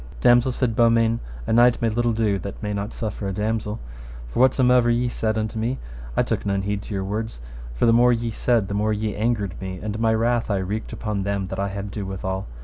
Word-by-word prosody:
Damosel, 120 Hz, +1 st, +5 dB
said 125 Hz, -2 st, 0 dB
Beaumains, 115 Hz, 0 st, +3 dB, 0.3 s
a -, -, 0 dB
knight 120 Hz, +1 st, +5 dB
may 115 Hz, -, +1 dB
little 120 Hz, +2 st, +1 dB
do 105 Hz, -3 st, +1 dB
that 100 Hz, +3 st, -7 dB
may 105 Hz, 0 st, -2 dB
not 100 Hz, +1 st, -3 dB
suffer 105 Hz, -2 st, -4 dB
a -, -, -2 dB
damosel, 105 Hz, +1 st, -2 dB, 0.5 s
for -, -, -3 dB
whatsomever 125 Hz, -1 st, +4 dB
ye 120 Hz, +1 st, +2 dB
said 110 Hz, -2 st, -1 dB
unto 110 Hz, +1 st, -2 dB
me 120 Hz, +4 st, -1 dB, 0.4 s
I -, -, +4 dB
took -, -, -2 dB
none 100 Hz, -1 st, 0 dB
heed 100 Hz, 0 st, -2 dB
to 105 Hz, -, -7 dB
your 95 Hz, -, -1 dB
words, 110 Hz, -, -4 dB, 0.4 s
for -, -, +2 dB
the 115 Hz, -, +5 dB
more 120 Hz, +1 st, +5 dB
ye 115 Hz, -1 st, 0 dB
said 115 Hz, -2 st, +1 dB
the 100 Hz, -, -4 dB
more 105 Hz, +1 st, +1 dB
ye 105 Hz, 0 st, -2 dB
angered 105 Hz, -4 st, -1 dB
me, 95 Hz, -1 st, -5 dB
and 105 Hz, 0 st, -4 dB
my 110 Hz, 0 st, +3 dB
wrath 115 Hz, +1 st, +1 dB
I 100 Hz, -, +1 dB
wreaked 100 Hz, +4 st, -3 dB
upon 105 Hz, -2 st, -3 dB
them 100 Hz, -1 st, -2 dB
that 95 Hz, -, -4 dB
I 100 Hz, -, 0 dB
had 100 Hz, 0 st, -5 dB
ado 100 Hz, -1 st, -5 dB
withal. 95 Hz, 0 st, -4 dB
110 Hz, 235 wpm, -23 LUFS, 100-115 Hz, 0.5 s, Damosel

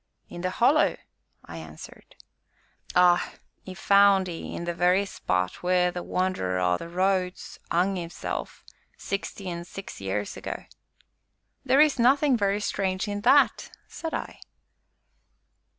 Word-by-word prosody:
"In 175 Hz, -, -8 dB
the 185 Hz, -, -1 dB
Hollow," -, -, +3 dB, 0.5 s
I 85 Hz, -1 st, -9 dB
answered. 80 Hz, -1 st, -12 dB, 0.8 s
"Ay, 180 Hz, -1 st, +4 dB, 0.3 s
'e 185 Hz, -, -8 dB
found 200 Hz, 0 st, +4 dB
'ee 170 Hz, -2 st, -6 dB
in -, -, -5 dB
the 175 Hz, 0 st, -2 dB
very 180 Hz, +3 st, +2 dB
spot 90 Hz, -, -2 dB
wheer 180 Hz, 0 st, +2 dB
the 175 Hz, -, -5 dB
Wanderer 180 Hz, -, -1 dB
o' 90 Hz, -1 st, +2 dB
the 170 Hz, -, -7 dB
Roads 185 Hz, +1 st, -1 dB
'ung 185 Hz, +3 st, +1 dB
'isself, 170 Hz, -1 st, -6 dB, 0.3 s
sixty 195 Hz, 0 st, -5 dB
an' 170 Hz, -1 st, -4 dB
six 195 Hz, -, -9 dB
years 100 Hz, +1 st, -3 dB
ago." -, -, -6 dB, 1.0 s
"There 270 Hz, +2 st, +4 dB
is 300 Hz, -4 st, +3 dB
nothing 270 Hz, +3 st, +4 dB
very 200 Hz, -2 st, +1 dB
strange 190 Hz, -1 st, -1 dB
in 205 Hz, 0 st, -3 dB
that!" 275 Hz, +6 st, +4 dB, 0.2 s
said 325 Hz, -, -5 dB
I. -, -, -6 dB
185 Hz, 135 wpm, -26 LUFS, 170-200 Hz, 1.0 s, Ay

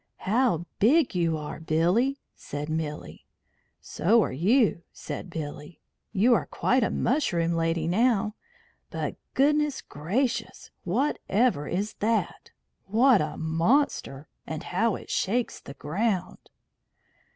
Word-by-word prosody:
"How 215 Hz, -5 st, +2 dB
big 265 Hz, +6 st, +4 dB
you 165 Hz, -3 st, +1 dB
are, 150 Hz, 0 st, -6 dB
Billy!" 175 Hz, -, +1 dB
said 145 Hz, +1 st, -6 dB
Milly. 155 Hz, -1 st, -5 dB, 0.5 s
"So 220 Hz, +6 st, +2 dB
are -, -, -3 dB
you," 195 Hz, -, +2 dB
said 185 Hz, -, -7 dB
Billy. 150 Hz, 0 st, -7 dB, 0.3 s
"You 225 Hz, +5 st, +4 dB
are -, -, +1 dB
quite 255 Hz, +1 st, +1 dB
a -, -, +1 dB
mushroom 185 Hz, -, 0 dB
lady 165 Hz, -1 st, 0 dB
now. 215 Hz, +2 st, +2 dB, 0.6 s
But -, -, -4 dB, 0.2 s
goodness 295 Hz, 0 st, +2 dB
gracious! 220 Hz, -, -3 dB
Whatever 220 Hz, -, +1 dB
is 200 Hz, +4 st, -2 dB
that? 225 Hz, +2 st, -1 dB, 0.4 s
What 230 Hz, +2 st, +5 dB
a 150 Hz, 0 st, -3 dB
monster! 165 Hz, -, 0 dB, 0.2 s
And 160 Hz, -1 st, -5 dB
how 215 Hz, +4 st, 0 dB
it -, -, -9 dB
shakes 235 Hz, +5 st, -1 dB
the 140 Hz, -, -11 dB
ground!" 185 Hz, +4 st, -2 dB
195 Hz, 120 wpm, -27 LUFS, 160-245 Hz, 0.6 s, What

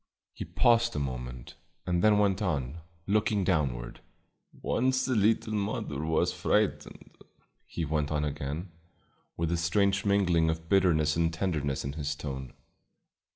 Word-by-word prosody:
He -, -, -6 dB
paused 115 Hz, +6 st, +3 dB
a -, -, 0 dB
moment, 60 Hz, -3 st, -6 dB, 0.3 s
and 90 Hz, -1 st, 0 dB
then 105 Hz, -1 st, +5 dB
went 100 Hz, -1 st, +2 dB
on, 75 Hz, -5 st, -2 dB, 0.3 s
looking 105 Hz, 0 st, +1 dB
downward. 70 Hz, -10 st, -1 dB, 0.5 s
"Once 130 Hz, +1 st, 0 dB
the 130 Hz, -, 0 dB
little 110 Hz, 0 st, +2 dB
mother 100 Hz, -9 st, -2 dB
was 80 Hz, 0 st, +1 dB
frightened," -, -, -1 dB, 0.5 s
he 85 Hz, -, -3 dB
went 75 Hz, -1 st, -1 dB
on 75 Hz, -1 st, 0 dB
again, 75 Hz, +5 st, -4 dB, 0.7 s
with 85 Hz, 0 st, -1 dB
a 85 Hz, -, +1 dB
strange 95 Hz, +3 st, +1 dB
mingling 90 Hz, -5 st, +3 dB
of 80 Hz, 0 st, -3 dB
bitterness 80 Hz, -5 st, +3 dB
and 85 Hz, 0 st, +1 dB
tenderness 80 Hz, -7 st, -2 dB
in 70 Hz, -, -3 dB
his 75 Hz, -1 st, -3 dB
tone. 65 Hz, -3 st, -6 dB
85 Hz, 140 wpm, -29 LUFS, 75-100 Hz, 0.7 s, then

